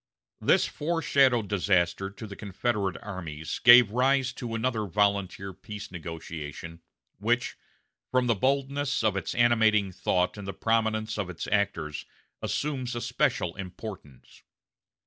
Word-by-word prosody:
This -, -, +3 dB
foreshadowed 140 Hz, -8 st, +2 dB
disaster 95 Hz, -1 st, +1 dB
to 100 Hz, +3 st, -9 dB
the 100 Hz, -2 st, -8 dB
Confederate 100 Hz, -1 st, -2 dB
armies 80 Hz, -6 st, -5 dB
gave 120 Hz, -2 st, +9 dB
rise 130 Hz, +1 st, +2 dB
to 120 Hz, -3 st, -5 dB
another 115 Hz, -2 st, -1 dB
volunteer 100 Hz, -1 st, 0 dB
peace 100 Hz, +2 st, -9 dB
negotiation, 80 Hz, -1 st, -7 dB, 0.4 s
which, 120 Hz, +3 st, 0 dB, 0.5 s
from 130 Hz, -1 st, +2 dB
the 120 Hz, -, +3 dB
boldness 140 Hz, +4 st, 0 dB
of 110 Hz, -3 st, +2 dB
its 100 Hz, -, -3 dB
animating 110 Hz, -4 st, +3 dB
thought 90 Hz, +1 st, 0 dB
and 100 Hz, -, -7 dB
the 95 Hz, -, -4 dB
prominence 110 Hz, -1 st, 0 dB
of 95 Hz, -3 st, -2 dB
its 90 Hz, -, -5 dB
actors, 80 Hz, -7 st, -1 dB, 0.4 s
assumes 130 Hz, -5 st, -2 dB
a 120 Hz, -, -3 dB
special 85 Hz, -6 st, 0 dB
importance. 90 Hz, -, -9 dB
105 Hz, 125 wpm, -28 LUFS, 95-120 Hz, 0.5 s, gave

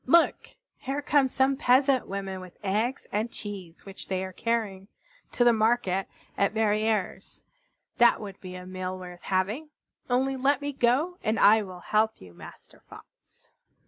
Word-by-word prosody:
Look! 335 Hz, +6 st, +3 dB, 0.2 s
Here 275 Hz, +2 st, -3 dB
come 280 Hz, -2 st, +3 dB
some 265 Hz, +1 st, +2 dB
peasant 265 Hz, -1 st, +3 dB
women 195 Hz, -1 st, -5 dB
with 185 Hz, -1 st, -12 dB
eggs 215 Hz, +7 st, -1 dB
and 220 Hz, +3 st, -1 dB
cheese 190 Hz, -5 st, -8 dB
which 195 Hz, -1 st, -9 dB
they 190 Hz, -1 st, -2 dB
are 185 Hz, -, -8 dB
carrying 210 Hz, -4 st, -2 dB, 0.5 s
to 245 Hz, -, +3 dB
the 240 Hz, -1 st, +6 dB
market 215 Hz, -4 st, +1 dB, 0.3 s
at 200 Hz, +2 st, +1 dB
Verrières. 215 Hz, -2 st, 0 dB, 0.6 s
That 235 Hz, -1 st, +6 dB
would 200 Hz, -3 st, -9 dB
be 185 Hz, -1 st, -8 dB
a 180 Hz, 0 st, -8 dB
meal 185 Hz, 0 st, -5 dB
worth 180 Hz, -1 st, -10 dB
having! 205 Hz, +11 st, -1 dB, 0.4 s
Only 265 Hz, +2 st, +1 dB
let 270 Hz, +1 st, +2 dB
me 285 Hz, 0 st, -4 dB
go, 275 Hz, +9 st, +1 dB
and 215 Hz, +1 st, 0 dB
I 220 Hz, +1 st, +6 dB
will 185 Hz, -3 st, -9 dB
help 220 Hz, +3 st, +1 dB
you, 90 Hz, -2 st, -14 dB
Master -, -, -14 dB
Fox." -, -, -17 dB
215 Hz, 160 wpm, -27 LUFS, 190-255 Hz, 0.6 s, the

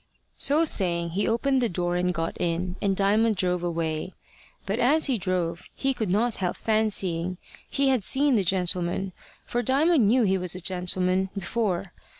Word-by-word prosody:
So 300 Hz, +4 st, +3 dB
saying, 170 Hz, -, +1 dB
he 195 Hz, +5 st, -1 dB
opened 260 Hz, +4 st, +1 dB
the 240 Hz, -, +1 dB
door 175 Hz, 0 st, -2 dB
and 180 Hz, 0 st, +1 dB
got 165 Hz, -1 st, -3 dB
in, 175 Hz, +1 st, -1 dB
and 195 Hz, -1 st, +1 dB
Diamond 215 Hz, +3 st, +2 dB
drove 180 Hz, -1 st, 0 dB
away. 165 Hz, 0 st, -3 dB, 0.5 s
But 200 Hz, +4 st, -2 dB
as 300 Hz, +6 st, +3 dB
he 260 Hz, -6 st, +1 dB
drove, 175 Hz, -2 st, -2 dB
he 270 Hz, 0 st, 0 dB
could 220 Hz, -6 st, -3 dB
not 220 Hz, +5 st, +1 dB
help 180 Hz, -2 st, -2 dB
fancying 190 Hz, -5 st, -1 dB, 0.3 s
he 275 Hz, 0 st, +1 dB
had 255 Hz, -6 st, +1 dB
seen 275 Hz, +6 st, +2 dB
the 210 Hz, -5 st, +2 dB
gentleman 180 Hz, 0 st, 0 dB, 0.3 s
for 240 Hz, -, -1 dB
Diamond 275 Hz, +1 st, +3 dB
knew 245 Hz, +3 st, +4 dB
he 190 Hz, -2 st, +2 dB
was 180 Hz, -1 st, 0 dB
a -, -, -5 dB
gentleman 185 Hz, +1 st, 0 dB
before. 195 Hz, -2 st, -2 dB
190 Hz, 170 wpm, -25 LUFS, 180-230 Hz, 0.5 s, knew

